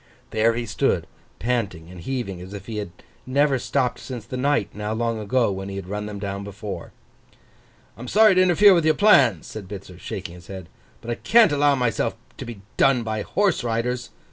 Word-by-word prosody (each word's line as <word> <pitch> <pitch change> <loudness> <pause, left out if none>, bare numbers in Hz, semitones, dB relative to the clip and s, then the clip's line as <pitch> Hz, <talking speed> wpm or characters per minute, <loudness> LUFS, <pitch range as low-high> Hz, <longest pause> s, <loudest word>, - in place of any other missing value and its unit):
There 115 +1 +2
he 120 0 -2
stood, 110 - 0 0.3
panting 95 -8 -2
and 90 -2 -10
heaving, 100 -5 -4
as 95 +3 -9
if 100 -1 -9
he 110 -2 -5
had 105 -3 -4 0.4
never 140 0 +2
stopped 125 0 -1
since 125 -4 -7
the - - -6
night, 140 +3 +1
now 105 +1 -3
long 115 0 -1
ago, 115 +1 +1
when 95 0 -5
he 100 - -6
had 100 -2 -6
run 105 +2 -4
them 105 -1 -6
down 100 0 -4
before. 100 0 -7 1.0
'I'm 120 +2 -9
sorry 215 - +6
to 185 - +4
interfere 185 +3 +6
with 170 -3 +3
your 155 0 +3
plans,' 140 - +5
said 105 -3 -8
Bitzer, 95 -2 -9
shaking 95 -2 -6
his 85 -1 -14
head, 95 -4 -8 0.3
'but 120 - -5
I - - -1
can't 230 -6 +5
allow 145 0 +3
myself 125 -3 0 0.2
to - - -5
be 115 -4 -8 0.2
done 135 -3 +4
by 110 -1 -2
horse 195 - +1
riders. 120 +1 -2
115 Hz, 200 wpm, -23 LUFS, 100-135 Hz, 1.0 s, sorry